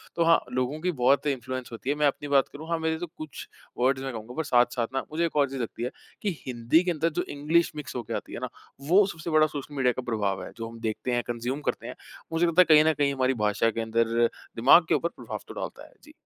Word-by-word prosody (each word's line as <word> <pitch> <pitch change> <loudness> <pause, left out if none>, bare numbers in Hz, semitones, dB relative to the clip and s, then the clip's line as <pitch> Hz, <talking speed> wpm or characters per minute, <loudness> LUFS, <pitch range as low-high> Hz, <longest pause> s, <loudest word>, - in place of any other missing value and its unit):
तो 170 - +2
हाँ, 165 0 +5
लोगों 130 +4 -1
की 180 +2 +1
बहुत 140 0 +2
इन्फ्लुएंस 130 -2 -3
होती 120 +3 -6
है। 145 - +2
मैं 150 0 +3
अपनी 145 +1 -2
बात 140 -2 +3
करूँ। 155 +3 -9
हाँ, 165 -1 0
मेरे 160 0 0
तो 175 - -4
कुछ 155 -3 -8 0.3
वर्ड्स 130 +2 +2
मैं 135 - -3
कहूँगा 110 +2 -7
पर 160 - 0
साथ-साथ 120 -3 +2
ना, 135 - -1
मुझे 165 +2 +1
एक 165 - -4
और 140 -2 +3
चीज़ 135 -1 -4
लगती 115 +1 -5
है, 125 - -2 0.3
कि 210 - 0 0.2
हिंदी 125 +6 +2
के 180 - 0
अंदर 165 0 0
जो - - +1
इंग्लिश 155 +4 +1
मिक्स 150 -3 -7
होके 120 - -4
आती - - -5
है - - -4
ना, - - -4 0.3
वो 185 +8 +5
सबसे 170 -4 -6
बड़ा 155 -1 +5
सोशल 145 -1 -7
मीडिया 130 -2 +3
का - - -1
प्रभाव 100 -3 -1
है। - - -8
जो 115 -1 -5
हम 115 0 -11
देखते 115 +2 -3
हैं 120 0 +1
कंज्यूम 120 +4 -3
करते - - -3
हैं। - - -7 0.4
मुझे 165 +2 +3
लगता 170 +2 +5
है - - +6
कहीं 150 - +7
न - - -2
कहीं 140 -1 +1
हमारी 130 -1 +1
भाषा 105 +2 +2
के 115 - -3
अंदर 115 0 0 0.4
दिमाग 135 +9 +7
के - - +4
ऊपर 170 - 0
प्रभाव - - -7
तो - - -8
डालता - - -6
है। - - -23
जी। 305 - -15
140 Hz, 265 wpm, -27 LUFS, 120-160 Hz, 0.4 s, कहीं